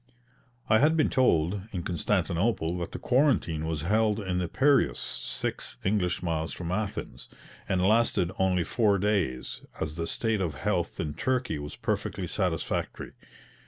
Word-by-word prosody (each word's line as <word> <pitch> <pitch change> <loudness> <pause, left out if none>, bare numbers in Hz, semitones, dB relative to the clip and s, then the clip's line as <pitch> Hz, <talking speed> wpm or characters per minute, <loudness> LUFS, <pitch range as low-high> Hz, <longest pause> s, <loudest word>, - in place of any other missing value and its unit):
I 110 - +5
had 155 +3 +4
been 155 - +3
told, 95 -7 +2
in 90 -3 -3
Constantinople, 90 0 0
that 85 - -4
the - - -5
quarantine 120 - +2
was 80 -2 -2
held 105 +3 +2
in 95 -3 -1
the 90 - -1
Piraeus 140 - +3
(six - - -4
English 95 -3 0
miles 80 -2 -1
from 85 -1 -5
Athens), 100 +1 -4 0.4
and 95 0 +2
lasted 110 -5 +3
only 95 -2 +2
four 105 +1 +2
days, 95 -11 -1 0.2
as 75 +1 -3
the 85 0 -2
state 110 -3 0
of 80 -6 -1
health 70 - -1
in 75 - -2
Turkey 125 - -1
was 75 0 -7
perfectly - - -2
satisfactory. - - -2
95 Hz, 150 wpm, -28 LUFS, 85-110 Hz, 0.4 s, I